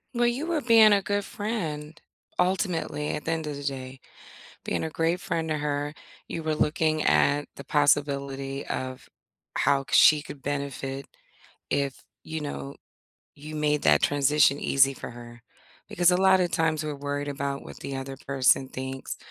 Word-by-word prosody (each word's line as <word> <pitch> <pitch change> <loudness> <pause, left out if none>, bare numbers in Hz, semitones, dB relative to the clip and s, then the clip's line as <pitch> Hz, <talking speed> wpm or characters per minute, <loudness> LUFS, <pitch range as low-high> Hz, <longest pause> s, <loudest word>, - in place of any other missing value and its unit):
Well, 240 0 +3
you 250 +7 0
were 335 -3 0
being 225 -3 +7
a 200 -1 +3
good 205 +1 -1
friend, 160 -10 -4 0.4
ultimately, 180 -5 0
at 150 - -4
the 165 - 0
end 160 -1 -2
of 150 -1 -4
the 145 - -7
day. 130 -1 -5 0.7
Being - - -1
a 160 - -2
great 165 +3 0
friend 165 -1 -2
to 155 - 0
her, 145 0 -2 0.3
you 165 - -4
were 155 -1 -1
looking 155 +1 +1
at 145 +1 +3
the 140 - -9
possibility 140 -1 0
of 130 0 -5 0.5
how 140 0 +2
c - - -5 0.2
she - - -5
could 145 -2 -10
benefit 140 -1 -4 0.6
if, 140 -2 -1 0.2
you 160 0 -4
know, 145 -1 -6 0.6
you 155 +2 -9
made 150 -1 +1
that 75 -1 +5
transition 145 0 +3
easy 135 0 +3
for - - -7
her, 120 0 -12 0.4
because 175 0 +3
a 180 - +3
lot 190 0 +5
of 180 -1 +1
times, 160 -1 0
we're 150 -1 -3
worried 145 +1 -3
about 140 0 -3
what - - -11
the 140 - -5
other 135 0 -6
person 135 -1 +3
thinks 130 0 -6
145 Hz, 170 wpm, -26 LUFS, 140-160 Hz, 0.7 s, being